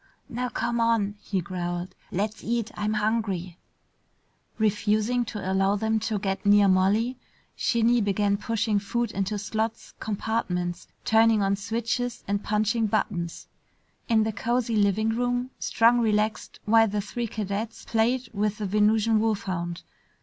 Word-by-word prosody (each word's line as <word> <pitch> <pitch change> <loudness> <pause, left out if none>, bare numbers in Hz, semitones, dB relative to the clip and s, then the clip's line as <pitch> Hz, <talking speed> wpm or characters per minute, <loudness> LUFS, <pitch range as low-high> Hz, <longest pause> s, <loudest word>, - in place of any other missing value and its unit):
"Now 250 0 -2
come 235 0 -1
on!" 230 -3 +2
he 195 -3 -2
growled. 175 0 -4 0.2
"Let's 210 +4 -2
eat. 235 -1 -1
I'm 210 +1 -1
hungry!" 210 -5 -1 1.0
Refusing 215 +3 +1
to 205 -4 -4
allow 195 +1 +2
them 220 +1 0
to 215 0 -1
get 195 -1 -2
near 205 0 +5
Molly, 205 +7 +2 0.4
Shinny 235 0 +2
began 200 0 +1
pushing 220 -1 0
food 235 +3 -2
into 195 +2 -2
slots, 220 +3 -3
compartments, 185 -5 -2 0.2
turning 225 -1 +4
on 195 0 +2
switches 230 +4 -2
and 200 0 -1
punching 215 +2 +1
buttons. 180 -5 -2 0.6
In 220 -2 +4
the 220 0 -2
cozy 235 +2 0
living 210 +1 +2
room, 245 +2 -1
Strong 235 +1 +3
relaxed 215 -1 0
while 225 +1 +5
the 205 0 -1
three 235 +3 -4
cadets 215 +1 -4
played 235 +3 +1
with 210 0 0
the 210 - -3
Venusian 215 +2 +3
wolfhound. 185 -6 -2
215 Hz, 135 wpm, -26 LUFS, 200-230 Hz, 1.0 s, near